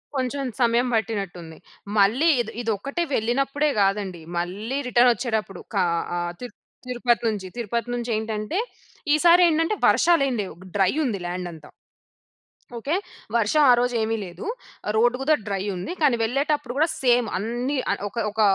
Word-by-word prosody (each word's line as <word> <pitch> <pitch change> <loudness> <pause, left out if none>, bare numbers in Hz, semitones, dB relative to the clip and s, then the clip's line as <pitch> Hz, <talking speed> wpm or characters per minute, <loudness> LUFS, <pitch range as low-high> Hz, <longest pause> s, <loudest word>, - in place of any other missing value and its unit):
కొంచెం 265 +2 -1 0.2
సమయం 240 +1 +3
పట్టినట్టు 200 -5 -2
ఉంది. 160 -1 -11 0.4
మళ్ళీ 245 +12 +4
ఇద్ 220 - -6
ఇది 225 -1 -1
ఒక్కటే 280 - -3
వెళ్ళినప్పుడే 275 +6 +1
కాదండి. 195 -3 0 0.2
మళ్ళీ 205 +10 -3
రిటర్న్ 245 0 +5
వచ్చేటప్పుడు, 220 -4 -3
కా - - +3 0.3
ఆహ్, 175 0 -2 0.5
తిరుపతి 240 -2 +1
నుంచి 205 -4 -2
తిరుపతి 235 +1 -2
నుంచి 240 0 -3
ఏంటంటే, 220 - -2 0.6
ఈసారి 345 +3 +6
ఏంటంటే, 330 +6 +1
వర్షాలేం 280 -6 +4
లేవు. 190 - -7 0.2
డ్రై 195 +1 +3
ఉంది 210 -6 -2
ల్యాండ్ 180 0 -4
అంతా. 160 -2 -13 1.1
ఓకే. 280 +8 -2 0.4
వర్షం 235 +7 +3
ఆ - - +8
రోజు 245 0 0
ఏమి 225 +1 0
లేదు. 175 0 -8 0.5
రోడ్ 240 +3 +3
గూడా 310 +3 +3
డ్రై 195 -2 -1
ఉంది 180 - -5
కానీ 275 -5 +4
వెళ్ళేటప్పుడు 275 +3 0
కూడా 320 +3 +4 0.2
సేమ్ 245 -2 +4
అన్నీ 240 +7 -2
ఆహ్, - - -2
ఒక 235 - -14
ఒక 220 +1 -1
235 Hz, 150 wpm, -24 LUFS, 200-270 Hz, 1.1 s, ఆ